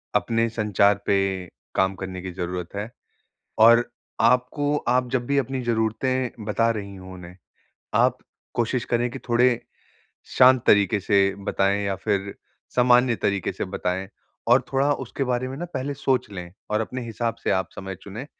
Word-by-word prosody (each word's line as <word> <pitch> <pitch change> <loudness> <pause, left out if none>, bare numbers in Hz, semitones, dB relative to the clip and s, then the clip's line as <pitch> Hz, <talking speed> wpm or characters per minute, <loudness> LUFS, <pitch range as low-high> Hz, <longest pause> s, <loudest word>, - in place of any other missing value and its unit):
अपने 115 0 +2
संचार 105 -2 +2
पे 95 -2 0 0.3
काम 95 0 +2
करने 95 -1 -6
की 95 0 -6
ज़रूरत 90 0 -5
है। 105 +3 -4 0.7
और 115 +2 +6 0.3
आपको 125 +5 +2
आप 125 +1 +2
जब 120 -1 -1
भी 140 +1 +1
अपनी 135 0 -1
ज़रूरतें 120 +1 -1
बता 115 +2 +1
रही 100 -3 -4
हो 95 0 -10
उन्हें, 90 0 -11 0.6
आप - - +3 0.4
कोशिश 120 +1 0
करें 120 0 0
की 135 - -7
थोड़े 120 +2 +4 0.9
शांत 130 -1 +7
तरीके 100 0 +4
से 100 0 +2
बताएँ 100 +1 +1
या 100 -1 0
फिर 100 0 -2 0.4
सामान्य 125 -1 +4
तरीके 100 -2 -1
से - - -4
बताएँ। 95 +1 -3 0.4
और 125 +2 +6
थोड़ा 135 +2 +2
उसके 135 0 -3
बारे 125 0 -1
में 135 - -6
ना 175 - -4
पहले 135 +2 -2
सोच 130 -5 0
लें 90 -3 -7 0.2
और 105 +1 +1
अपने 125 +3 -4
हिसाब 115 0 -2
से - - +1
आप 95 -1 +1
समय 95 0 -6
चुनें, 110 +7 -8
110 Hz, 165 wpm, -24 LUFS, 100-125 Hz, 0.9 s, शांत